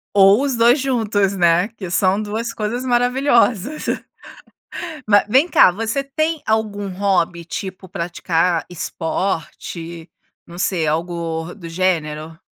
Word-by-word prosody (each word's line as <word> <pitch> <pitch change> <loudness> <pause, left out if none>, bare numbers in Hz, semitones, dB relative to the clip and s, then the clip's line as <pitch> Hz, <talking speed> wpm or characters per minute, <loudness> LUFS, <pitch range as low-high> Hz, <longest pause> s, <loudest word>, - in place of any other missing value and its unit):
Ou 200 +3 +6
os 275 -3 0
dois 240 +4 +5
juntos, 215 -7 0
né? 175 +1 +3
Que 210 -5 -8
são 190 +2 +2
duas 220 +3 -3
coisas 225 +4 -3
maravilhosas. 245 0 +2 1.2
Ma 205 -1 +5
vem 265 +9 +4
cá, 320 - +6
você 225 +8 -2
tem 310 +3 -2
algum 210 -2 -1
hobby 180 -3 0
tipo 185 +1 -6
praticar 170 0 -1
esporte? 170 -1 -4 0.4
Não 170 +1 -11
sei. 180 -3 0
Algo 165 +1 -2
do 175 -5 -9
gênero? 165 -3 -2
195 Hz, 120 wpm, -20 LUFS, 170-230 Hz, 1.2 s, Ou